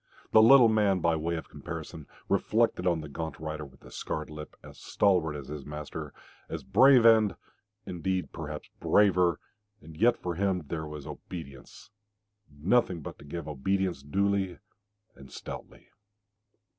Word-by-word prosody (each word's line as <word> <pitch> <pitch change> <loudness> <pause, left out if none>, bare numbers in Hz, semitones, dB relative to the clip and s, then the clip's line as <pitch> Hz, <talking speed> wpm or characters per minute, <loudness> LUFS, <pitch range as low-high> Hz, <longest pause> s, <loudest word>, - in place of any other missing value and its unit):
The 110 - +7
little 120 +2 +8
man, 105 -4 +2
by 85 -1 +2
way 85 +2 -2
of 80 - -6
comparison, 80 0 -8 0.2
reflected 110 -5 +1
on 85 -3 +1
the 75 - -8
gaunt 80 +3 -6
rider 80 0 -5
with 65 -2 -14
the - - -14
scarred 75 0 -5
lip, 75 0 -9
as - - -13
stalwart 90 -6 +1
as 70 -3 -8
his 75 -2 -6
master, 75 +1 -7 0.4
as - - -5
brave 130 -3 +6
and, 110 -3 +6 0.5
indeed, 90 +1 -2
perhaps 75 -2 -6
braver, 90 -4 +3 0.4
and 80 0 -13
yet 115 +8 +3
for 90 - -4
him 95 -1 0
there 80 -2 -3
was 75 -2 -8
obedience, 70 -7 -10 0.6
nothing 85 +4 +1
but - - -9
to - - -13
give 80 +2 -6
obedience 90 +3 -1
duly 95 +4 0 0.6
and 70 -1 -15
stoutly... - - -9
85 Hz, 150 wpm, -29 LUFS, 75-100 Hz, 0.6 s, little